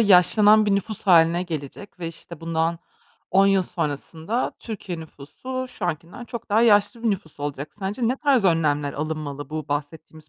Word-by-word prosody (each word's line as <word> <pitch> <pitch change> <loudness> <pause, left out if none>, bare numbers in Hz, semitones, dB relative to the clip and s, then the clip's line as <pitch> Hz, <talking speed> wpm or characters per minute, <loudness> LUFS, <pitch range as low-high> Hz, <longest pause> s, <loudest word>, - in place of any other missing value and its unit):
yaşlanan 210 +2 +6
bir 205 - +3
nüfus 200 +2 -3
hâline 170 -2 +5
gelecek 170 +4 -7
ve, 165 - -3
işte, 165 0 -10
bundan 165 0 -1 0.5
10 195 +1 +5
yıl 195 -1 +4
sonrasında 160 - -3
Türkiye 195 -6 -6
nüfusu 255 - -7
şu 215 - -7
ankinden 170 +7 -5
çok 235 -1 -7
daha 220 +3 +4
yaşlı 215 +1 +4
bir 230 - +2
nüfus 180 -7 -5
olacak. 145 0 -5
Sence 210 +4 -1
ne 255 - 0
tarz 270 -6 +2
önlemler 150 -5 +2
alınmalı 150 -1 -4
bu 155 -2 -5
bahsettiğimiz 155 +2 -5
175 Hz, 165 wpm, -24 LUFS, 155-210 Hz, 0.5 s, yaşlanan